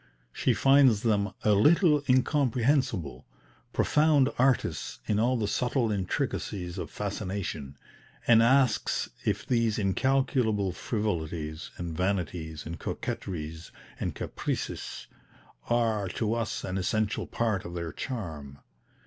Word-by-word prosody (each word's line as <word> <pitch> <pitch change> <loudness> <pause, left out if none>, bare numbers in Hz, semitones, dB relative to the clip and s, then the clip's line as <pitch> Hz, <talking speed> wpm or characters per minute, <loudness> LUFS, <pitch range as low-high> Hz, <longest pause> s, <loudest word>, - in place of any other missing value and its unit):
She - - +1
finds 135 -6 +5
them 105 -3 +1
"a 105 - +4
little 150 - +5
incomprehensible," 130 - +1 0.5
"profound 150 -3 +3
artists 130 0 +1
in 105 -1 +1
all 125 +3 +2
the 110 -3 -1
subtle 120 +2 0
intricacies 95 -3 -2
of - - -5
fascination," 95 -8 -4 0.5
and 115 -1 +6
asks 130 0 +2
if 105 0 0
these 115 -4 +1
"incalculable 110 -1 +1
frivolities 85 -6 -3
and 85 -2 -5
vanities 85 -4 -2
and 80 0 -6
coquetries 80 -2 -5 0.3
and - - -3
caprices" - - -4 0.6
are, 110 -4 +1
to 110 +4 -1
us, 115 -2 -2
an 95 +1 -2
essential 105 +3 -1
part 110 -5 -1
of 85 0 -7
their 85 -2 -3
charm? 80 - -6
105 Hz, 115 wpm, -28 LUFS, 90-125 Hz, 0.6 s, and